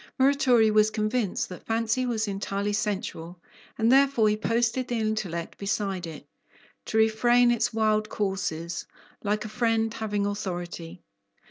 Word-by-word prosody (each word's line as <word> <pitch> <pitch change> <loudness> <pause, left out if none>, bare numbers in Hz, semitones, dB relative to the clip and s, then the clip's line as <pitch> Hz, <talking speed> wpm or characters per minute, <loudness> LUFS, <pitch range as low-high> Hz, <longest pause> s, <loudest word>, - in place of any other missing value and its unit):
Muratori 260 -5 +4
was 215 0 +5
convinced 215 -1 -1
that 180 - -10
fancy 230 +3 0
was 220 -3 -1
entirely 200 +1 -2
sensual, 185 -4 -3 0.4
and 225 +1 +3
therefore 270 -5 +4
he 210 - +2
posted 230 +3 0
the 240 - -1
intellect 215 -7 -3
beside 195 -3 -2
it, 160 -2 -9 0.6
"to 220 - -2
refrain 240 +2 +4
its 235 - +1
wild 215 -1 +1
courses, 170 -5 -3 0.4
like 210 +1 -1
a - - -3
friend 225 0 0
having 210 -3 -2
authority." 175 -3 -5
215 Hz, 135 wpm, -26 LUFS, 195-230 Hz, 0.6 s, was